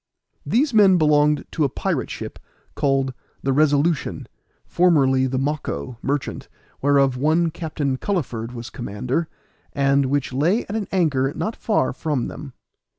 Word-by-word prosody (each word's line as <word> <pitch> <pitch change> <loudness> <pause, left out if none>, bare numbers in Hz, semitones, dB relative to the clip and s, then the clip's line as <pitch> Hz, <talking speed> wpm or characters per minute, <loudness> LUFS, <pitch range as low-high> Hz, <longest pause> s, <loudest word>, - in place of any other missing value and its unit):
These 265 +3 +2
men 200 -4 +6
belonged 150 -2 +3
to 155 - 0
a 140 - +2
pirate - - -2
ship, - - -7 0.3
called 135 -2 0 0.3
the 135 - +1
Resolution, 150 +2 +1 0.4
formerly 135 -7 +3
the 130 0 -2
Mocco, 130 - -3
merchant, 140 0 -3 0.3
whereof 140 -2 +3
one 160 +5 +2
Captain 155 -5 -2
Culliford 125 - -2
was 115 -2 -8
commander, 125 +8 -3 0.5
and 140 0 +2
which 140 -1 -1
lay 170 - +2
at 205 - -5
an 215 -3 -2
anchor 140 -8 +1
not 220 - -3
far 210 - 0
from 145 -2 -2
them. 140 -4 -9
145 Hz, 140 wpm, -22 LUFS, 130-165 Hz, 0.5 s, men